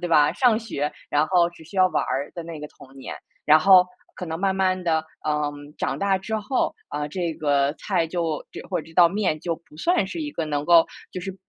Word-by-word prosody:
对 175 - -3
吧？ 150 -2 +4
上 240 -4 +3
学， 150 -10 -3 0.2
然 150 +1 +2
后 175 -2 +4
只 175 - -16
需 170 - -12
要 185 0 +6
玩 - - 0
儿 140 +2 -2
的 170 - -5
那 165 -1 -8
个 150 - -6
童 135 - -17
年。 135 - -7 0.3
然 155 +1 +7
后 185 +1 +7 0.3
可 180 - -6
能 160 0 -4
慢 190 +1 +1
慢 185 -1 +1
地， 160 -2 +2 0.2
嗯， 145 -1 -2
长 - - -2
大 195 -1 +1
之 220 +4 -3
后 235 +5 -1
啊 150 0 -3
这 175 0 -2
个 145 -2 +1
菜 175 -5 0
就 165 -3 -2
这 - - -7
或 180 -3 -1
者 155 - -7
这 165 - -15
道 170 0 +6
面 185 -5 -1
就 170 -2 -2
不 170 - -22
算 345 - +2
是 330 - -5
一 295 -1 -3
个 165 - -3
能 145 -1 -2
够 170 -1 +6 0.2
就 185 - -6
是 190 +1 -6
170 Hz, 255 characters per minute, -24 LUFS, 150-190 Hz, 0.3 s, 然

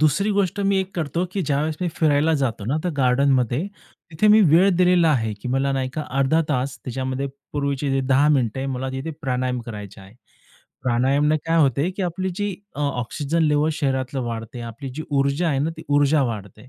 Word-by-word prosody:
दुसरी 170 +8 +2
गोष्ट 200 -1 0
मी 195 0 +2
एक 190 0 -6
करतो, 170 +1 -1
की 195 - -1
ज्यावेळेस 150 +1 -1
मी 180 - 0
फिरायला 155 0 +2
जातो 115 -5 -2
ना, 135 +7 0
तर 180 - 0
गार्डनमध्ये. 130 - +2 0.4
तिथे 165 +7 +1
मी 215 +1 +7
वेळ 180 +5 +6
दिलेला 180 -2 +4
आहे 110 -6 0
की 125 - -5
मला 135 +2 +1
नाही 130 -1 -1
का, 155 - -2 0.2
अर्धा 140 +4 +3
तास 135 -1 -1
त्याच्यामध्ये 130 +2 -3 0.3
पूर्वीचे 140 -1 -1
जे 135 - +1
10 140 +3 +4
मिनिटं 130 -5 +1
आहे, 135 - -2
मला 130 0 -3
तिथे 135 +5 -4
प्राणायाम 125 -1 -1
करायचा 105 -3 -8
आहे. 95 +3 -16 0.7
प्राणायामाने 135 +5 +2
काय 165 0 +2
होते, 140 +6 +1
की 190 +1 -5
आपली 185 +2 -2
जी 205 -1 -2 0.2
अ, - - -4
ऑक्सिजन 145 +4 -1
लेव्हल 150 0 +2
शरीरातले 135 -3 -1
वाढते, 115 +1 -6
आपली 115 +4 -7
जी 155 - -4
ऊर्जा 140 +4 +1
आहे 140 -3 0
ना, 155 +4 0
ती 160 - -9
ऊर्जा 145 0 +3
वाढते. 110 +1 -6
140 Hz, 195 wpm, -22 LUFS, 130-160 Hz, 0.7 s, मी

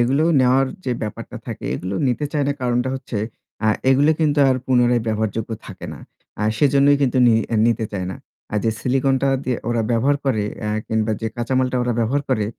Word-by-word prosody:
এগুলো 135 +6 +2 0.2
নেওয়ার 130 +1 +4 0.2
যে 125 - 0
ব্যাপারটা 105 - -6
থাকে - - -6
এগুলো 95 +2 -4
নিতে 125 +4 -1
চায় 145 -2 +1
না - - +2
কারণটা 125 0 0
হচ্ছে 125 -4 -5 0.5
আ - - +4 0.2
এগুলো 140 +4 +4
কিন্তু 150 -2 +2
আর 130 - +3
পুনরায় 125 -2 +3
ব্যবহারযোগ্য 110 +1 -2 0.2
থাকে - - -8
না। - - -12 0.4
আ - - 0 0.2
সেজন্যই 140 0 +4
কিন্তু 130 -1 +2
নি 115 - +5 0.3
নিতে 115 -1 +1
চায় 95 -2 -3
না। - - -6 0.4
আর 105 - +1
যে 115 - +3
সিলিকনটা 135 +1 +1 0.2
দিয়ে 125 -2 0
ওরা 120 -1 +1
ব্যবহার 130 +5 +2
করে 120 -6 +1 0.2
এ্যা 105 - -2 0.2
কিংবা 110 0 0
যে 115 - -2
কাঁচামালটা 130 +1 0
ওরা 125 0 0
ব্যবহার 125 +5 +1
করে 115 -6 +1
125 Hz, 190 wpm, -21 LUFS, 115-135 Hz, 0.5 s, নি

